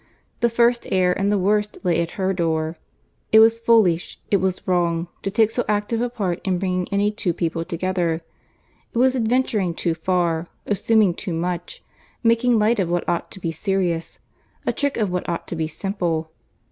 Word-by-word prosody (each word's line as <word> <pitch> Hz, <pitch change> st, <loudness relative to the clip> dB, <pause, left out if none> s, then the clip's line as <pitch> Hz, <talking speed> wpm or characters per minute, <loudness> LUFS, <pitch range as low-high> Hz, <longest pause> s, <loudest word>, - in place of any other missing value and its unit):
The 235 Hz, -, +3 dB
first 235 Hz, +1 st, +2 dB
error 185 Hz, -1 st, +3 dB
and 195 Hz, +2 st, 0 dB
the 205 Hz, -, +2 dB
worst 210 Hz, +2 st, +1 dB
lay 175 Hz, -2 st, +2 dB
at 170 Hz, -, -5 dB
her 190 Hz, -1 st, +1 dB
door. 160 Hz, -2 st, -1 dB, 0.6 s
It 220 Hz, -, +7 dB
was 225 Hz, +1 st, +6 dB
foolish, 220 Hz, -8 st, +2 dB
it 200 Hz, -, +5 dB
was 190 Hz, -1 st, -2 dB
wrong, 170 Hz, -2 st, +1 dB
to 195 Hz, -, -2 dB
take 220 Hz, +2 st, +3 dB
so 245 Hz, -, 0 dB
active 210 Hz, +2 st, 0 dB
a 245 Hz, -, 0 dB
part 195 Hz, -7 st, -2 dB
in 185 Hz, -3 st, 0 dB
bringing 180 Hz, -1 st, -1 dB
any 200 Hz, +1 st, +2 dB
two 190 Hz, -4 st, -1 dB
people 165 Hz, -1 st, -1 dB
together. 170 Hz, -1 st, -1 dB, 0.7 s
It -, -, -4 dB
was 260 Hz, +2 st, +4 dB
adventuring 225 Hz, -7 st, +1 dB
too 170 Hz, -1 st, 0 dB
far, 170 Hz, 0 st, 0 dB, 0.2 s
assuming 210 Hz, -1 st, +3 dB
too 180 Hz, 0 st, -5 dB
much, 175 Hz, -, -4 dB, 0.4 s
making 230 Hz, +1 st, +3 dB
light 215 Hz, +1 st, +2 dB
of 180 Hz, -3 st, 0 dB
what 175 Hz, 0 st, -1 dB
ought 170 Hz, -, -1 dB
to -, -, -10 dB
be 170 Hz, -3 st, -2 dB
serious, 175 Hz, -1 st, -1 dB, 0.5 s
a -, -, +1 dB
trick 285 Hz, -1 st, -1 dB
of 210 Hz, -5 st, 0 dB
what 180 Hz, 0 st, -2 dB
ought 170 Hz, -, -3 dB
to -, -, -3 dB
be 160 Hz, -1 st, -1 dB
simple. 165 Hz, -2 st, -2 dB
185 Hz, 185 wpm, -22 LUFS, 170-220 Hz, 0.7 s, It